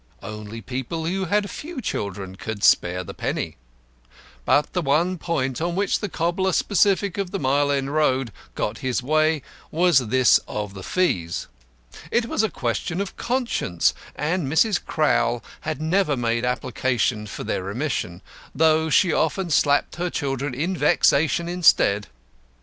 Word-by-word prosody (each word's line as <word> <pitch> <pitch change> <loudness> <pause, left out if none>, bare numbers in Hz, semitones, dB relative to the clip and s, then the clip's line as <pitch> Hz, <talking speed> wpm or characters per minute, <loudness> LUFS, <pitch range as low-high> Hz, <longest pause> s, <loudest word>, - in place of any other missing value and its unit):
Only 105 +1 -7
people 130 - -4
who 190 +3 -1
had 205 +3 +1
few 310 - -7
children 100 - -4
could 105 +1 -6
spare 90 +1 +3
the - - -8
penny. - - -3 0.9
But 145 - +2
the 180 - 0
one 165 +5 +1
point 135 -6 -2
on 170 +1 -1
which 200 +1 +1
the 210 - -3
cobbler 175 +3 0
sceptic 200 -1 +2
of 195 -2 -2
the 195 - -3
Mile 140 -1 +1
End 140 0 -1
Road 135 -5 +1 0.2
got 105 +1 -2
his 130 -1 -1
way 155 +1 +2 0.3
was 170 -2 +4
this 130 +1 +5
of 105 -2 -4
the 95 - -8
fees. 90 - -1 0.6
It 235 0 +1
was 230 - 0
a 220 - +1
question 130 - -2
of 200 -1 -4
conscience, 235 - 0 0.2
and 160 +1 -1
Mrs. 175 +8 +2
Crowl 120 -6 +1 0.2
had 155 -1 -4
never 160 -2 +1
made 115 0 0
application 125 -3 -1
for - - -6
their - - -2
remission, 100 - -3 0.3
though 160 0 +3
she 175 +2 +4
often 175 +2 0
slapped 145 +1 +2
her 175 +1 -1
children 135 -3 -2
in 170 +8 -1
vexation 160 +1 +3
instead. 160 - +3
150 Hz, 150 wpm, -23 LUFS, 120-175 Hz, 0.9 s, this